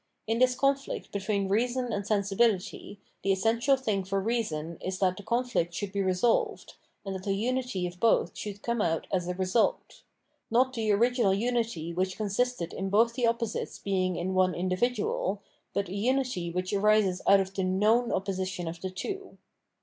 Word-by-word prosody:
In 225 +1 0
this 255 0 +4
conflict 275 +1 -1
between 200 0 -1
reason 240 +4 0
and 200 0 -3
sensibility, 205 -1 0 0.2
the 195 - +1
essen 225 +4 +1
tial 270 +3 +3
thing 210 -7 -1
for 195 +1 -1
reason 180 -8 -2
is 185 0 -2
that 185 -1 +2
the 205 - -9
conflict 235 -6 -1
should 200 -2 -3
be 200 0 -1
re 190 -1 +1
solved, 230 +5 +1 0.3
and 195 - -3
that 190 - -5
the 195 -1 0
unity 245 -3 -1
of 180 0 -6
both 230 - +2
should 205 -1 -6
come 235 -2 0
out 165 -4 0
as 180 -2 0
a 180 - -2
result: 185 +5 0 0.5
not 255 +3 +3
the 220 -3 0
original 230 -1 +3
unity 225 -7 -1
which 185 +1 -1
consisted 215 -3 -1
in 195 0 -3
both 230 +4 +4
the 240 0 +1
opposites 230 -1 -2
being 185 -2 0
in 180 +2 -2
one 185 -1 +3
individual, 195 +1 -1 0.3
but 200 -1 -1
a 180 - -7
unity 245 -4 0
which 180 +3 -3
arises 200 -2 +3
out 200 0 +7
of 190 0 -2
the 195 - -2
Tmovm 210 +6 +2
opposition 185 -2 -2
of 165 +1 -6
the 190 - -3
two. 385 - -6
200 Hz, 180 wpm, -29 LUFS, 185-235 Hz, 0.5 s, out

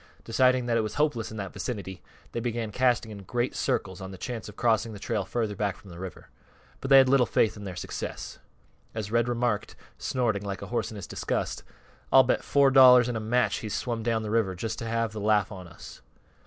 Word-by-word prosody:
Deciding 130 +1 +3
that 120 -1 +1
it - - +3
was 110 -1 -4
hopeless 145 -7 0
in 110 - -8
that 100 -2 -5
vicinity, 95 - -5 0.3
they - - -3
began 115 -2 -3
casting 120 -1 +1
in 100 -1 -8
great 120 +6 -2
circles 95 0 -1
on 95 - -6
the 95 - -9
chance 115 +1 -5
of 105 - -12
crossing 115 -1 +1
the - - -8
trail 105 -2 -2
further 110 0 -2
back 100 -2 -1
from 95 - -14
the 85 - -10
river. 95 -1 -8 0.5
But 135 - -5
they 135 - +9
had 135 -1 +7
little 130 -2 +4
faith 110 - +2
in 105 -1 -9
their 95 -2 -6
success. - - -6 0.6
As 105 -2 -4
Red 115 0 +2
remarked, 120 -3 -1 0.2
snorting 120 -6 0
like 100 -1 -5
a - - -8
horse - - 0
in 110 - -9
his 100 - -6
disgust, - - -3 0.5
"I'll 135 - +8
bet 125 - 0
four 140 -1 +4
dollars 125 -2 +8
an' 120 - -2
a - - -1
match 120 +3 +1
he's 105 -2 -4
swum 120 -2 -2
down 110 0 0
th' 105 - -4
river 110 -5 +1
just 110 +4 -4
to - - -5
have 115 -1 0
th' 110 - -9
laugh 105 -1 +2
on 95 -3 -8
us." 85 - -12
115 Hz, 230 wpm, -27 LUFS, 100-120 Hz, 0.6 s, they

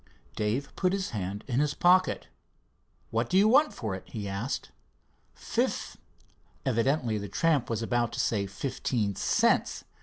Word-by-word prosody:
Dave 110 +6 -2
put 185 -1 +1
his 195 -1 -2
hand 100 -1 -4
in 125 -1 0
his 150 0 +1
pocket. 185 +1 +3 0.9
"What 115 +1 0
do 185 - +3
you 200 +2 +6
want 290 +7 +5
for 110 -4 -4
it?" 95 - -5
he 105 -3 -5
asked. 100 +7 -3 1.9
Evidently 120 -2 +1
the 100 -1 -6
tramp 150 +2 +1
was 115 -1 -1
about 120 0 0
to - - -4
say 100 -3 +1
"fifteen 105 0 -2
cents." - - +2
120 Hz, 145 wpm, -29 LUFS, 105-150 Hz, 1.9 s, you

